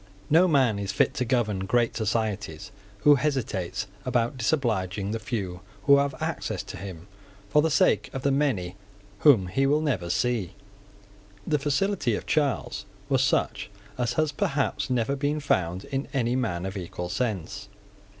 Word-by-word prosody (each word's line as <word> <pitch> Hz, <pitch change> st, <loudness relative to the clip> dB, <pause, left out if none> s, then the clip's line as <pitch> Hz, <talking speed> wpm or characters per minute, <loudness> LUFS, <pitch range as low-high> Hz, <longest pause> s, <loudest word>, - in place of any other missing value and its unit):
No 170 Hz, +4 st, +6 dB
man 130 Hz, -, +3 dB
is 100 Hz, -1 st, -2 dB
fit 95 Hz, -, +2 dB
to 125 Hz, -, -1 dB
govern 110 Hz, -6 st, 0 dB
great 120 Hz, +2 st, +2 dB
societies 105 Hz, -4 st, -2 dB, 0.3 s
who 145 Hz, -, +7 dB
hesitates 130 Hz, -, -1 dB, 0.2 s
about 120 Hz, -1 st, 0 dB
disobliging 110 Hz, -, 0 dB
the 115 Hz, -, -2 dB
few 100 Hz, -5 st, -4 dB, 0.2 s
who 140 Hz, 0 st, +7 dB
have 140 Hz, -1 st, +1 dB
access -, -, -3 dB
to -, -, -8 dB
him, 95 Hz, -4 st, -8 dB, 0.4 s
for 150 Hz, -, +4 dB
the 160 Hz, -, +2 dB
sake -, -, +3 dB
of 135 Hz, -, -5 dB
the 140 Hz, -, +2 dB
many 120 Hz, -11 st, 0 dB, 0.4 s
whom 125 Hz, -11 st, +6 dB
he 135 Hz, +10 st, +1 dB
will 150 Hz, +2 st, +3 dB
never 110 Hz, -, -1 dB
see. 110 Hz, -3 st, 0 dB, 0.9 s
The 150 Hz, -, +1 dB
facility 145 Hz, -, +1 dB
of -, -, -5 dB
Charles 145 Hz, -8 st, 0 dB, 0.2 s
was -, -, +3 dB
such 105 Hz, -, 0 dB, 0.3 s
as 125 Hz, -1 st, -1 dB
has 155 Hz, +3 st, +1 dB
perhaps 140 Hz, -1 st, -1 dB
never 125 Hz, +2 st, +1 dB
been 145 Hz, +2 st, -1 dB
found 95 Hz, -, 0 dB
in 135 Hz, 0 st, -3 dB
any 120 Hz, -2 st, +1 dB
man 95 Hz, -9 st, -1 dB
of 95 Hz, +1 st, -4 dB
equal 90 Hz, -1 st, -5 dB
sense. 105 Hz, -2 st, -3 dB
120 Hz, 160 wpm, -26 LUFS, 95-140 Hz, 0.9 s, who